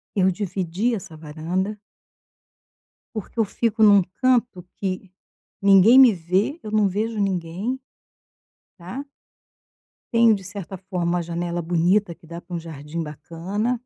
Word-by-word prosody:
eu 190 -1 +4
dividi 190 +3 -2
essa 170 -6 -7
varanda 170 +7 -3 1.3
porque 215 +2 -7
eu - - +5
fico 225 +2 -1
em - - +9
um 200 -2 +7 0.2
canto 245 -8 +2
que 190 -1 -4 0.5
ninguém 200 +5 +7
me 255 -4 +9
vê, 185 - 0
eu 215 - -7
não 215 -1 +3
vejo 215 +3 -2
ninguém, 195 +6 -2 1.0
tá. 190 +11 -7 1.1
Tenho, 230 -1 +6
de 195 - -5
certa 190 0 -7
forma, 180 -2 -2
uma 175 - 0
janela 170 +1 -3
bonita 175 +3 +2
que 165 - -20
dá 170 +1 -8
para 175 0 -7
um - - -2
jardim 160 0 -7
bacana. 170 - -3
190 Hz, 140 wpm, -23 LUFS, 170-215 Hz, 1.3 s, em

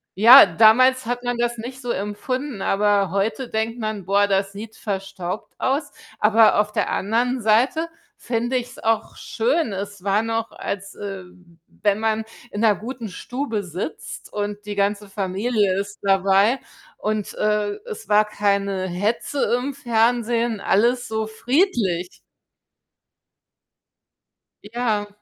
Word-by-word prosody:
Ja, 235 +7 +10
damals 230 +8 +5
hat 245 +1 -3
man 245 0 -1
das 240 0 -1
nicht 255 +4 -7
so 245 - -3
empfunden, 235 +4 -4
aber 200 -2 +2
heute 215 +6 -1
denkt 225 +2 -2
man: 215 -4 -4
„Boah, 200 +2 +3
das 195 0 0
sieht 215 +2 -9
verstaubt 190 -2 -5
aus”, 285 +3 -1 0.3
aber 220 0 +5
auf 210 0 +1
der - - 0
anderen 240 +5 0
Seite 240 +10 +2 0.3
finde 240 +2 -1
ich's 245 +1 -6
auch 225 0 -1
schön. 340 - -1
Es 200 0 -6
war 200 +1 +2
noch, 225 0 -2
als, 200 0 -6
ähm, 180 -4 -10
wenn 205 0 -1
man 220 0 0 0.3
in 205 - -5
'ner 220 -3 +4
guten 235 +1 -7
Stube 230 +2 -4
sitzt 185 - -7
und 205 0 -4
die 205 0 -5
ganze 200 +1 0
Familie 200 +1 0
ist 200 +1 -6
dabei 195 +5 +3 0.4
und, 215 -1 -2
äh, 210 -1 0
es 445 - -8
war 210 +1 +5
keine 200 -2 0
Hetze 210 +9 -1
im 270 +3 -3
Fernsehen, 235 -2 +1
alles 240 +6 +2
so 220 0 -2
friedlich. 220 - 0 2.4
Ja. 215 -1 -2
215 Hz, 135 wpm, -22 LUFS, 200-240 Hz, 2.4 s, Ja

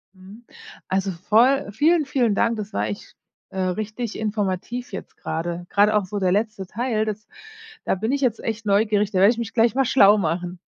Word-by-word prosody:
Mhm, 195 +5 -14 0.4
also 190 0 -1
voll 220 +7 +2
vielen, 305 - +2
vielen 245 -6 +1
Dank. 230 +1 +1
Das 210 -1 -6
war 105 +1 -1
echt, 105 - -8 0.3
äh, 190 - -6
richtig 215 +5 -3
informativ 215 +3 -3
jetzt - - -8
grade, 170 +2 -4
grade 210 +1 +3
auch 210 -2 +2
so 205 +2 -4
der 185 -2 +1
letzte 210 0 -1
Teil, 220 +1 -1
das 215 0 -5 0.6
da - - 0
bin 220 +6 -2
ich 280 - -1
jetzt 240 -5 +1
echt 225 0 -4
neugierig. 210 0 +2
Da 185 - 0
werde 200 +3 +6
ich 235 - -4
mich 230 -2 -5
gleich 230 -1 +2
mal 270 -1 +2
schlau 215 -5 +6
machen. 175 0 -2
210 Hz, 195 wpm, -23 LUFS, 190-230 Hz, 0.6 s, werde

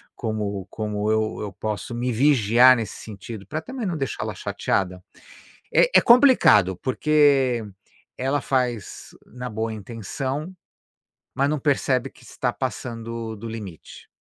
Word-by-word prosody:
como 105 -3 -3
como 105 -1 -2
eu 110 0 0
eu 105 -2 -4
posso 105 +1 -4
me 125 +1 -1
vigiar 125 -1 +5
nesse 115 -3 -5
sentido, 105 -1 -9
pra 155 +7 -3
também 255 +2 -6
não 175 -4 -2
deixar 135 -3 -3
ela - - -4
chateada? 90 -1 -2 0.7
É, - - +5
é - - +6
complicado, 235 - +6
porque 135 -3 +2 0.5
ela 135 +2 0
faz 125 -6 -2
na 125 +1 -7
boa 110 +1 -3
intenção, 130 - -5 0.8
mas 140 +2 +2
não 150 -1 -1
percebe 135 -2 +1
que - - -21
está 125 -2 -2
passando 115 -2 -5
do 110 +3 -8
limite. 105 -7 -9
120 Hz, 135 wpm, -23 LUFS, 105-135 Hz, 0.8 s, é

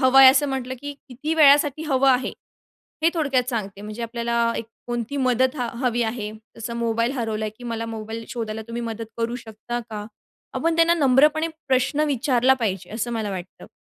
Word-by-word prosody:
हवं 260 +1 +5
आहे, 265 - +11
असं 290 +1 +2
म्हटलं, 260 -1 -3
की 285 0 -5 0.2
किती 295 +6 -3
वेळासाठी 295 0 +5
हवं 270 -2 +3
आहे, 255 0 +2 0.7
हे 330 - +6
थोडक्यात 270 -6 +1
सांगते. 200 -4 -4
म्हणजे 215 +2 -6
आपल्याला 235 0 0
एक 230 - -3 0.2
कोणती 240 +3 -3
मदत 260 +1 +2
ह 250 - -1 0.2
हवी 240 -1 +2
आहे, 220 -2 -3 0.3
जसं 235 +1 -5
मोबाईल 230 +1 0
हरवला 220 -4 -2
आहे, 215 - -2
की 245 - -11
"मला 230 -1 -3
मोबाईल 225 0 -6
शोधायला 220 -2 -4
तुम्ही 235 +1 -4
मदत 225 -1 -4
करू 235 +1 -1
शकता 235 +1 -6
का?" 210 -1 -5 0.5
आपण 330 0 +1
त्यांना 335 +1 +5
नम्रपणे 300 +2 +4 0.2
प्रश्न 260 +3 +2
विचारला 265 -2 +3
पाहिजे, 190 -4 -1
असं 235 +2 -2
मला 220 -3 -2
वाटतं. 185 -1 -7
240 Hz, 185 wpm, -23 LUFS, 225-270 Hz, 0.7 s, आहे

